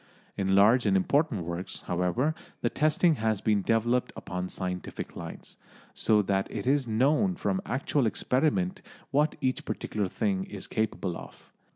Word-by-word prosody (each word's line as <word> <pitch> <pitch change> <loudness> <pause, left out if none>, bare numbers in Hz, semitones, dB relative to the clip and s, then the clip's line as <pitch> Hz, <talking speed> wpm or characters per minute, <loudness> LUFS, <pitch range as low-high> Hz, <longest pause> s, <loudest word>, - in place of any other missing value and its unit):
In 95 -1 +1
large 110 +4 +5
and 95 -1 +4
important 135 - +1
works, 85 +2 -5
however, 90 - +1 0.3
the 120 - 0
testing 155 +1 +3
has 110 -2 0
been 105 -1 +2
developed 115 +4 +1
upon 90 0 -4
scientific 90 -1 -5
lines, 85 -1 -8 0.4
so 105 -1 +3
that 95 0 0
it 105 - -5
is 135 -1 +2
known 145 - +2
from 190 +1 -1
actual 135 -1 +1
experiment 160 - 0 0.3
what 150 +2 +2
each 130 0 0
particular 105 -2 -2
thing 190 - -1
is 190 - -6
capable 105 -5 -2
of. - - -12
115 Hz, 150 wpm, -28 LUFS, 95-150 Hz, 0.4 s, large